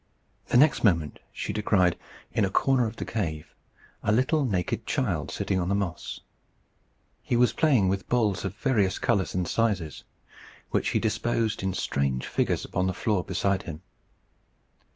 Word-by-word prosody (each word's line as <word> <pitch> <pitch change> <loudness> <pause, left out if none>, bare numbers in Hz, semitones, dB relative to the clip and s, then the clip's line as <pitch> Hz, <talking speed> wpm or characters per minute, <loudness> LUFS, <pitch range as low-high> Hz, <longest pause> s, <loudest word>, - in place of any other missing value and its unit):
The - - +3
next 145 +3 +4
moment 85 -9 +2
she - - -4
descried, 100 -4 +2 0.4
in 105 - +2
a 95 - +2
corner 125 +4 +2
of 110 - -6
the - - -5
cave, 80 -9 -3 0.5
a 105 - +1
little 130 +7 +2
naked 95 -7 -1
child - - -1
sitting 95 - -1
on 90 0 -1
the 100 - +2
moss. 95 -4 -3 1.0
He - - -1
was 120 +1 +4
playing 130 -11 +3
with 95 +1 -2
balls 110 -6 +1
of 95 -1 -4
various 105 -6 +1
colours 100 -7 0
and 90 -2 0
sizes, 100 -10 -1 0.7
which - - +1
he - - +1
disposed 110 0 0
in 95 -1 -1
strange 70 -7 -1
figures - - 0
upon 95 0 -1
the 95 - -2
floor 105 -3 0
beside 95 +1 0
him. 80 -4 -8
100 Hz, 160 wpm, -27 LUFS, 90-115 Hz, 1.0 s, next